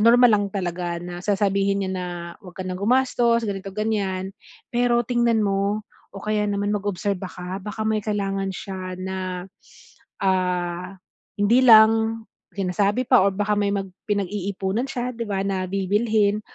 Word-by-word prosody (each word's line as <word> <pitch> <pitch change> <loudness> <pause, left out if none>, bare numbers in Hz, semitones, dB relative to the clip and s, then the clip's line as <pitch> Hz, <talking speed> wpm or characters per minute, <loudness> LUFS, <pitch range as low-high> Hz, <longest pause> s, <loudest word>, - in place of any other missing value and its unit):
normal 240 +2 +7
lang 205 -1 +3
talaga 175 -3 -3
na 175 0 -7
sasabihin 200 -1 +1
niya 190 - -3
na, 180 -1 -3 0.3
wag 180 -2 -13
ka 185 - -5
ng 185 0 -4
gumastos 235 0 +2
ganito 195 -2 -4
ganyan, 195 -3 -2 0.4
pero 240 0 +2
tingnan 235 -2 +2
mo 200 +2 0 0.3
o - - -6
kaya 210 -1 0
naman 205 +1 0
mag-obserba 200 -2 -2
ka 180 +2 -6
baka 210 +2 -5
may 220 -1 +1
kailangan 195 -2 -2
siya 185 -2 -6
na, 185 -1 -4 0.8
ah, 180 0 0 0.4
hindi 225 +5 +4
lang 225 0 +6 0.3
sinasabi 200 +5 0
pa 250 -7 +6
or 200 - +4
baka 210 +1 +1
may 205 -1 +1
mag 195 -1 -2 0.2
pinag-iipunan 200 +3 -1
siya 250 -1 -3
'di 230 0 -4
ba 195 -1 -1
na 190 -1 -1
bibilhin. 205 +2 +1
200 Hz, 150 wpm, -23 LUFS, 190-220 Hz, 0.8 s, normal